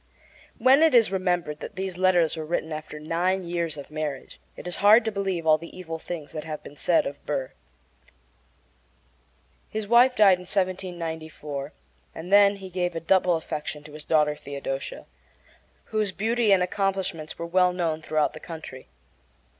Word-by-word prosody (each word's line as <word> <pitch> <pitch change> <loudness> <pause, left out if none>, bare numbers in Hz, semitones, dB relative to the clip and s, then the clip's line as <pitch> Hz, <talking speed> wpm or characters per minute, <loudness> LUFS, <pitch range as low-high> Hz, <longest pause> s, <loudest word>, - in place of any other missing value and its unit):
When 265 +3 +5
it 320 -5 +5
is 225 -5 +5
remembered 175 -5 -1
that - - -8
these 190 -1 -4
letters 175 -3 +3
were 160 - -4
written 160 0 -2
after 155 0 -7
nine 175 +5 0
years 170 -3 -2
of 140 +1 -9
marriage 150 -3 -5 0.2
it - - -9
is 180 - -3
hard 215 +3 +6
to 220 - 0
believe 195 -4 -2
all 155 -1 +5
the 170 +3 -11
evil 165 -3 -6
things 160 -3 -7
that 155 - -5
have 155 -2 -6
been 145 - -11
said 170 +3 +2
of 140 - -6
Burr. 135 -3 -2 2.2
His 215 -1 -4
wife 245 +3 +5
died 195 -5 +6
in 180 - -12
1794, 165 -6 -3 0.4
and 160 - -7
he 180 - -9
then 200 -1 +4
gave 180 -1 -2
a - - -1
double 180 +1 +3
affection 150 -2 -5
to 150 0 -13
his 150 0 -9
daughter 150 -2 +2
Theodosia, 140 -2 -6 0.8
whose 215 -3 -1
beauty 225 +3 +1
and 190 -2 +5
accomplishments 190 -4 -2
were 180 +2 +2
known 165 -3 -2
throughout 155 -1 0
the 155 - -9
country. 160 -6 -9
175 Hz, 165 wpm, -26 LUFS, 155-190 Hz, 2.2 s, hard